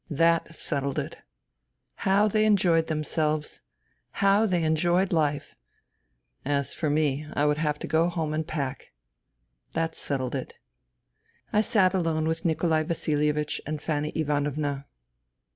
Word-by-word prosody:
That 165 +1 +2
settled 140 -3 -1
it. - - -4 0.8
How 200 +2 +3
they 215 +1 +2
enjoyed 175 -6 +3
themselves! 155 -1 -1 0.5
How 200 +2 +3
they 175 -4 +1
enjoyed 175 +4 +2
life! 150 -3 0 0.9
As 140 -1 -1
for 155 - -1
me, 150 -1 0
I 145 - +2
would 150 0 +2
have 150 -2 0
to - - -6
go 165 +2 +2
home 160 -3 -2
and 155 0 -2
pack.... 140 - -4 0.8
That 165 0 -1
settled 130 -5 -2
it. 135 -2 -5 1.0
I 210 - +5
sat 195 -4 +3
alone 165 -4 0
with 160 +1 -2
Nikolai 160 -1 +2
Vasilievich 150 -2 0
and 155 0 -3
Fanny 150 -1 -2
Ivanovna. 145 -2 -1
155 Hz, 130 wpm, -27 LUFS, 150-170 Hz, 1.0 s, I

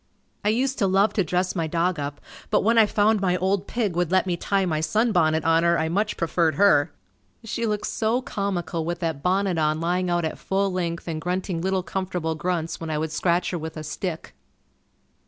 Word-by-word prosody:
I 205 - +2
used 260 +5 0
to 200 - +3
love 195 +2 +3
to 200 - +2
dress 180 +3 -1
my 165 -3 -1
dog 170 +1 0
up 145 0 -4 0.3
but - - +2
when 230 +2 +4
I 220 - +6
found 210 0 +2
my 180 -2 +2
old 190 +1 0
pig 215 -7 -1
would 175 -2 0
let 190 0 +3
me 180 -2 0
tie 195 +2 0
my 155 -3 -1
sunbonnet 160 -3 +2
on 165 0 +4
her 170 0 +3
I 160 0 0
much 205 +5 0
preferred 165 -2 +1
her. 160 -5 +4 0.5
She 230 +1 -2
looked 210 -1 -1
so 225 +2 0
comical 185 -8 -3
with 175 +2 -2
that 160 -4 -2
bonnet 185 0 +1
on 155 0 +1
lying 180 +2 0
out 175 -1 +1
at 160 - -4
full 195 0 0
length 170 -2 -3
and 160 -2 -3
grunting 180 0 -2
little 190 0 0
comfortable 180 -4 -2
grunts 165 0 -2
when 165 - -5
I 155 - -1
would 155 0 -2
scratch 175 +2 +1
her 175 - -2
with 160 +1 -6
a 155 - -5
stick. 160 +2 -5
180 Hz, 210 wpm, -24 LUFS, 165-195 Hz, 0.5 s, I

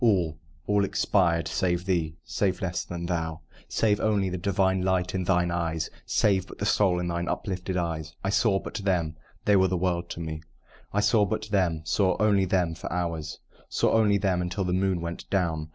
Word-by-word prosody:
All 90 -9 +2 0.3
all 105 -1 +2
expired 90 -4 +2
save 90 -1 0
thee 85 -5 0
save 95 -3 -1
less 90 -2 -2
than 85 0 -5
thou: 80 -2 -2 0.3
Save 105 -2 +2
only 100 -3 +1
the 90 - -2
divine 95 0 +1
light 90 -1 0
in 95 -1 -1
thine 90 -1 +2
eyes 85 -2 -2 0.2
Save 95 -3 +2
but - - -11
the 100 - -2
soul 100 -3 +3
in 90 - -2
thine 85 0 -2
uplifted 95 -1 -3
eyes. 80 -3 -3
I 95 - 0
saw 105 -2 +3
but - - -6
them 90 -6 0 0.3
they 105 - +5
were 95 -1 +5
the 90 0 0
world 85 -1 -1
to - - -6
me! 80 -1 -5 0.5
I 105 - +1
saw 105 0 +4
but 110 +2 -2
them 90 -6 +1
saw 95 +2 +2
only 100 -3 +3
them 90 -2 +1
for - - -7
hours, 85 -3 -3 0.3
Saw - - +2
only 105 -2 +4
them 95 -2 +1
until 90 +3 -2
the 90 -1 -1
moon 95 -1 +1
went 85 0 -6
down. 80 -5 0
90 Hz, 200 wpm, -27 LUFS, 85-100 Hz, 0.5 s, they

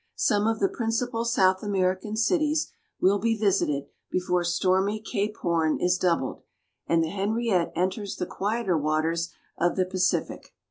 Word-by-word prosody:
Some 210 0 +2
of 225 0 +1
the 195 - +3
principal 230 +1 -2
South 190 -5 +3
American 195 0 -1
cities 305 +6 +1 0.3
will 200 +2 +3
be 225 +2 +1
visited 185 -9 +1 0.2
before 180 -1 0
stormy 190 +4 +1
Cape 210 -1 -3
Horn 165 -3 +1
is 180 0 +2
doubled, 170 -8 0 0.5
and 165 -1 +3
the 160 - -2
Henriette 205 -2 0
enters 190 +3 -1
the - - -3
quieter 205 0 -1
waters 160 +2 0 0.3
of 175 +1 +2
the 185 - +2
Pacific. 185 0 -1
190 Hz, 145 wpm, -26 LUFS, 175-220 Hz, 0.5 s, the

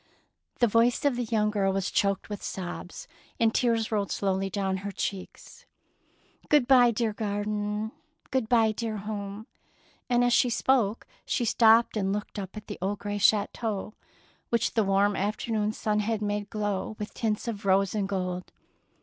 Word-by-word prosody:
The 245 - +4
voice 230 +4 +2
of 280 -3 +3
the 245 0 -2
young 215 -1 +1
girl 195 -2 +1
was 195 -1 -1
choked 200 -1 +1
with 205 -2 -6
sobs, 180 -1 -6 0.3
and 225 -1 +3
tears 230 -3 +1
rolled 205 -3 0
slowly 195 -1 0
down 190 0 -1
her 200 +1 -5
cheeks. 200 - -6 0.4
" - - -33
Good 295 -5 +4
bye, 250 -3 +7
dear 225 -1 0
garden; 210 +1 -2 0.4
good 255 -4 0
bye, 225 -2 +4
dear 220 0 -3
home 205 0 -6 0.3
"; - - -34
and 245 0 +3
as 245 0 +3
she 245 - +4
spoke 235 -3 +1 0.2
she 240 - -1
stopped 225 +1 +5
and 195 -2 0
looked 205 +1 -4
up 195 +1 -7
at 210 - -8
the - - -7
old 200 +2 -1
grey 205 0 -4
chateau 210 0 +1 0.6
which 235 -1 +1
the 220 - +3
warm 200 +1 +2
afternoon 210 +1 -1
sun 215 -1 -1
had 215 +1 0
made 205 -1 -2
glow 205 -1 -2
with 210 - -6
tints 220 0 -2
of 215 -3 -4
rose 195 0 +2
and 200 -2 -1
gold. 180 -2 -3
210 Hz, 175 wpm, -27 LUFS, 200-230 Hz, 0.6 s, bye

